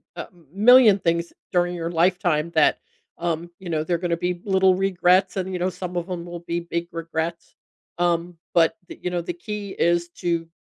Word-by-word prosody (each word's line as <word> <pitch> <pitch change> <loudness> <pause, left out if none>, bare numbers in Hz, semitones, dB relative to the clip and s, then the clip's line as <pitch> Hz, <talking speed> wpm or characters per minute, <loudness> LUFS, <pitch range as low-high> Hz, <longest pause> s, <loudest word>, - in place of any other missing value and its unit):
a - - -6 0.3
million 220 0 +7
things 170 -1 -1 0.2
during 175 0 +1
your 170 -1 -3
lifetime 170 -2 +1
that, 160 -2 +3 0.4
um, 170 0 -2
you 190 -2 -8
know, 155 -2 0
they're 170 +2 0
gonna 170 -1 -1
be 180 0 -2
little 190 -2 +4
regrets, 185 0 +2
and, 190 0 -2
you 180 - -2
know, 180 +1 +1
some 180 0 -7
of 175 +2 -3
'em 175 -2 -4
will 175 0 -7
be 170 0 -3
big 170 0 -4
regrets, 165 0 -4 0.4
um, 175 0 0 0.2
but, 165 -1 +4
the - - -10
you 180 - -2
know, 175 -1 -2
the 175 +1 -4
key 210 -1 -4
is 170 0 +2
to 170 -1 -2
175 Hz, 190 wpm, -23 LUFS, 170-185 Hz, 0.4 s, million